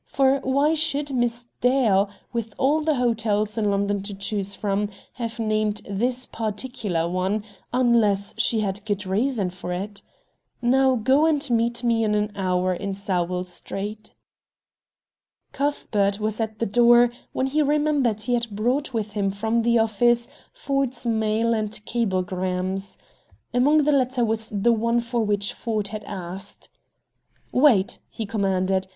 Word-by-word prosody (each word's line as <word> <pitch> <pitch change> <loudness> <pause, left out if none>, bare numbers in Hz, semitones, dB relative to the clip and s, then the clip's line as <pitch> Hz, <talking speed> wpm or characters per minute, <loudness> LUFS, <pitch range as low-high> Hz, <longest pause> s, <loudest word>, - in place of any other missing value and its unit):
For 270 0 +3
why 280 +4 +2
should 290 -2 -1
Miss 240 -1 0
Dale, 230 -6 +3 0.2
with 225 -3 -3
all 290 +4 +2
the 310 -1 +1
hotels 220 -4 0
in 215 -2 +1
London 200 0 0
to 200 0 -6
choose 200 0 -2
from, 205 0 -1 0.2
have 230 -2 -5
named 215 -2 0
this 240 +6 -1
particular 210 -6 -3
one, 185 +4 -1 0.3
unless 230 -5 +2
she 225 0 +1
had 200 0 -3
good 205 -2 -2
reason 205 0 0
for 180 0 -7
it? 200 +3 -5 0.6
Now, 260 +2 +3
go, 265 +7 +3
and 295 -2 +1
meet 235 +1 +1
me 230 -1 +2
in 210 -1 +1
an 210 0 0
hour 185 -1 +1
in 195 +2 -4
Sowell 180 -2 -1
Street." 205 +4 -6 1.4
Cuthbert 210 -8 0
was 215 +1 -2
at 220 -1 -3
the 230 - 0
door 240 +3 +5 0.2
when 260 - -1
he 290 +3 +1
remembered 290 -7 +1
he 245 - -1
had 235 -1 0
brought 245 +6 -1
with 215 -2 -2
him 205 -2 0
from 220 +4 0
the 235 +1 +3
office 235 +2 +2 0.2
Ford's 275 - -2
mail 225 0 +1
and 215 -2 -1 0.2
cablegrams. 185 -3 -2 0.6
Among 290 +5 +4
the 300 - +3
latter 255 -3 +2
was 220 0 -1
the 215 +3 +2
one 230 +1 +1
for 235 0 -1
which 205 -1 0
Ford 215 -4 -2
had 215 -1 -6
asked. 190 0 -7 0.8
"Wait," 250 -8 +4
he 225 - -5
commanded. 190 -2 0
220 Hz, 145 wpm, -24 LUFS, 200-245 Hz, 1.4 s, door